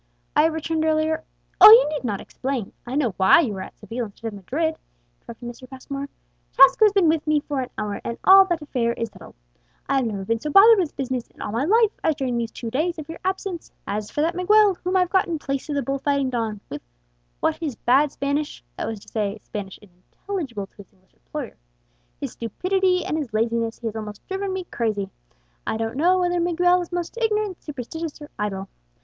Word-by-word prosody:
"I - - +6
have 325 - +1
returned 320 0 -1
earlier 315 0 +1 0.2
" - - -39
"Oh, - - +13
you 460 -3 +9
need 300 -2 -4
not 210 -5 -2
explain; 260 -6 -4
I 250 - -4
know 260 -8 +1
why 190 - +6
you 230 -10 -2
are - - -5
at - - -10
Seville 230 +3 -5
instead 225 +2 -7
of - - -11
Madrid," 290 - -1 0.5
interrupted 235 +1 -10
Mr. 240 +1 -10
Passmore. 275 +1 -6 0.4
"Tasco 435 - +7
has 420 - +5
been 390 -4 +3
with 315 -1 +1
me 305 -1 +3
for 285 -2 -3
an 255 - -5
hour, 210 -1 -3
and 235 - -4
all 390 0 +8
that 345 -4 -2
affair 235 -5 -1
is 230 -1 -4
settled. 185 -5 -14 0.5
I 275 - +2
have 260 -3 +1
never 200 -3 -4
been 230 +2 0
so 300 - -4
bothered 410 +7 +8
with 345 -5 -1
business 260 -3 -3
in - - -26
all - - -4
my 235 +6 0
life 440 +4 +4
as 315 - +2
during 265 -4 -2
these 235 -1 -1
two 230 0 -7
days 330 +7 0
of 310 0 -8
your 325 - -7
absence. 375 -2 -3
As 210 +1 -3
for 295 - -2
that 330 +3 +1
Miguel, 410 +3 +4
whom 370 +1 +1
I've 360 -1 +1
got 380 0 +3
in 335 -2 -2
place 275 0 -4
of 295 - -1
the 280 - 0
bull 275 0 -2
fighting 280 -1 0
don, 225 -4 -2
what - - -7 0.6
with 315 - +1
his 310 -6 -4
bad 270 +6 +3
Spanish" 285 +2 -3
(that - - -3
was 220 -3 -5
to - - -17
say, 210 -1 -2
Spanish 195 -2 -7
unintelligible 210 - -6
to - - -31
his 200 - -14
English 190 -1 -33
employer), - - -7 0.6
"his - - -4
stupidity, 365 - 0
and 310 - -1
his 265 -7 -5
laziness, 230 +1 0
he 235 - -11
has 225 -1 -3
almost 210 -2 -7
driven 385 0 -3
me 375 0 -3
crazy. 205 -4 -2 0.6
I - - -1
don't 225 +1 -3
know 350 +6 +3
whether 355 0 +1
Miguel 355 +1 +3
is 350 - -7
most 350 +6 -4
ignorant, 425 -4 0
superstitious, 300 +3 -6
or 295 0 -11
idle. 195 -2 -3
280 Hz, 225 wpm, -23 LUFS, 225-345 Hz, 0.6 s, Oh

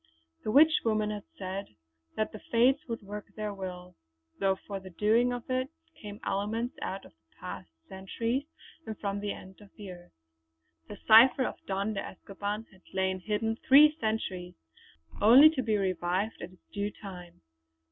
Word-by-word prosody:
The - - -3
Witch 305 +7 +6
woman 215 -2 +1
had 210 -1 -6
said 190 - -6 0.4
that 215 - -1
the 215 - -9
Fates 255 +5 +3
would 230 -3 -5
work 205 +1 -7
their 215 -1 -3
will, 180 -2 -7 0.5
though 195 -1 +2
for 195 +1 -7
the 190 0 -11
doing 220 +7 +2
of 245 -1 -5
it 255 +1 -1 0.2
came 205 0 -10
elements 215 +5 -2
out 195 +1 -4
of - - -16 0.3
past - - -7 0.2
centuries 230 +8 -3 0.4
and 220 -2 -5
from 200 -1 -3
the 205 0 -3
ends 190 +1 -11
of 205 - -15
the 200 -3 -8
earth. 175 -1 -14 0.7
The - - -9
cipher 235 +4 +8
of - - -6
Don 200 +2 -1
de 195 - -2
Escoban 205 +3 -5
had 190 -1 -20
lain 190 0 0
hidden 220 +3 -1
three 300 +3 +8
centuries, 190 - -3 0.7
only 260 +9 +9
to 285 -5 -2
be 220 -4 +1
revived 185 +2 -1
at 175 - -7
its 185 - -22
due 205 0 -1
time. 180 -5 -11
210 Hz, 165 wpm, -29 LUFS, 190-225 Hz, 0.7 s, only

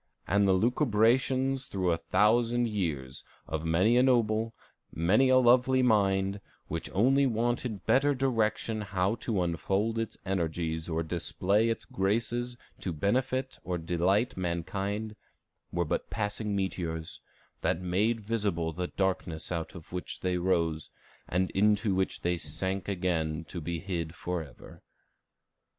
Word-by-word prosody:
"And 100 +2 +3
the 95 - +5
lucubrations 125 +4 +2
through 95 -3 0
a 85 - +1
thousand 115 +8 +2
years, 80 - -3 0.2
of 80 0 -3
many 90 +9 +3
a - - +6
noble, 115 -3 +2 0.4
many 105 +11 +3
a 130 - +6
lovely 130 +1 +5
mind, 100 -3 +2 0.3
which 80 +1 -4
only 135 +7 +4
wanted 120 -2 -1
better 140 +2 +3
direction 115 -4 0
how 100 -1 0
to 105 -7 -1
unfold 95 +6 0
its 115 - -4
energies 80 -3 -2
or 80 0 -1
display 90 +6 +1
its 115 - -2
graces 120 +5 -1 0.2
to 90 - -3
benefit 130 - -1
or 90 -1 -2
delight 90 +8 +1
mankind, 100 +5 -3 0.6
were 85 0 0
but - - -2
passing 105 -1 -2
meteors, 85 -4 -3 0.4
that 80 - +1
made 100 +6 0
visible 100 -7 -1
the 90 +2 -3
darkness 90 -4 -2
out 85 +1 -3
of 85 0 -11
which 90 - -5
they 90 -1 0
rose, 85 -3 0 0.4
and 90 +2 0
into 105 +1 +2
which 95 0 -1
they 90 0 0
sank 95 +3 -3
again 85 -5 -1
to 85 - -6
be 85 +2 -3
hid 85 -2 -4
forever." 85 -6 -6
95 Hz, 135 wpm, -29 LUFS, 85-115 Hz, 0.6 s, a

